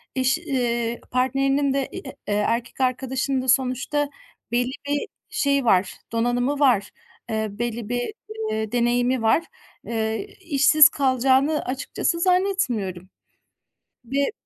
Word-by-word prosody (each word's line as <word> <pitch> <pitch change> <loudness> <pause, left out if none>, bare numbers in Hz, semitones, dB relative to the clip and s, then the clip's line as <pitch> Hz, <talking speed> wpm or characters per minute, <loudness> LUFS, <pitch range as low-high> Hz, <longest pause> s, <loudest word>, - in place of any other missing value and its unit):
eşi 260 +5 +1
eee, 240 -6 -1
partnerinin 270 +2 +1
de 275 -1 0
i - - -6
e - - -5 0.3
eee, 205 - 0
erkek 230 +5 -1
arkadaşının 260 +1 0
da 260 - -6
sonuçta 265 +3 +1 0.4
belli 245 +1 +1 0.2
bir 290 0 -1 0.2
şeyi 280 -2 +1
var 185 -3 +3 0.2
donanımı 245 +5 0
var, 240 -8 +3 0.4
eee, 220 0 -1
belli 230 0 -4
bir, 245 - -2 0.4
eee, 220 0 -2
deneyimi 245 +1 +1
var. 225 +9 +3 0.4
Eee, 225 - -2
işsiz 305 -2 +6
kalacağını 270 +2 +2
açıkçası 275 +6 -2
zannetmiyorum. 300 - 0 1.0
Ve, 275 - 0
255 Hz, 120 wpm, -23 LUFS, 235-280 Hz, 1.0 s, işsiz